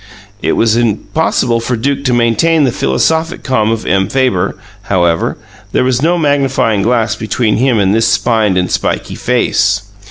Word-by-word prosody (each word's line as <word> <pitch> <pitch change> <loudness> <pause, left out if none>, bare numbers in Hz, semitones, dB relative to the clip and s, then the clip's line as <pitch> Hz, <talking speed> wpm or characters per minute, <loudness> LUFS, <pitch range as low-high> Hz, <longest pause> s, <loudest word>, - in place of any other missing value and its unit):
It - - 0
was 115 -1 +2
impossible 120 +2 0
for 120 +2 -2
Duke 140 +4 -2
to 125 - +2
maintain 120 +7 +2
the 130 - +2
philosophic 160 - -1
calm 110 -5 0
of 115 -1 -2
M. 95 +1 +1
Fabre, 125 -9 0 0.3
however; 85 -4 0 0.4
there - - +2
was 130 -1 0
no 170 +3 +2
magnifying 135 -8 +1
glass 115 0 +1
between 110 0 -1
him 125 0 +2
and 100 -1 +2
this 115 +1 +2
spined 110 -3 +1
and 90 -1 -1
spiky - - -2
face. 100 0 0
115 Hz, 160 wpm, -13 LUFS, 105-130 Hz, 0.4 s, was